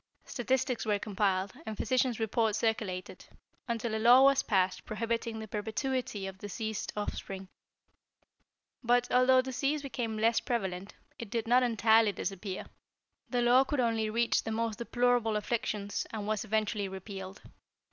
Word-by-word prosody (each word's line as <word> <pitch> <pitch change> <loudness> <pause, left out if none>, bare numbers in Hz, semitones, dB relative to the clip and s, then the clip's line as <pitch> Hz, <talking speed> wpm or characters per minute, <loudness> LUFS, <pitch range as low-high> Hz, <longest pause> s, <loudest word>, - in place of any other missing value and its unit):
"Statistics 255 0 -1
were 210 -1 +1
compiled, 195 -2 -1
and 220 -6 -6
physician's 250 0 +1
reports 220 -1 +1
circulated, 210 -5 -2 0.4
until 230 -1 -2
a 220 - -1
law 245 +3 +8
was 275 0 +5
passed 185 -5 +1
prohibiting 230 +1 -3
the 220 0 -6
perpetuity 220 0 -3
of 190 0 -7
diseased 215 +1 -4
offspring. 195 -2 -5 1.3
But, 245 +1 +2
although 255 +1 +5
disease 275 +3 -1
became 240 -5 -3
less 225 +1 +3
prevalent, 195 -5 -3 0.2
it 230 - -7
did 230 +1 -2
not 245 +2 +5
entirely 225 -3 +4
disappear. 195 +1 -4 0.6
The 245 -1 +1
law 245 +2 +6
could 270 +1 -2
only 225 -3 +1
reach 235 +2 +2
the - - -5
most 225 -1 -1
deplorable 240 -2 +1
afflictions, 210 -2 -2
and 215 -2 -4
was 215 -1 -1
eventually 215 -1 -1
repealed. 190 0 -8
220 Hz, 140 wpm, -31 LUFS, 205-245 Hz, 1.3 s, law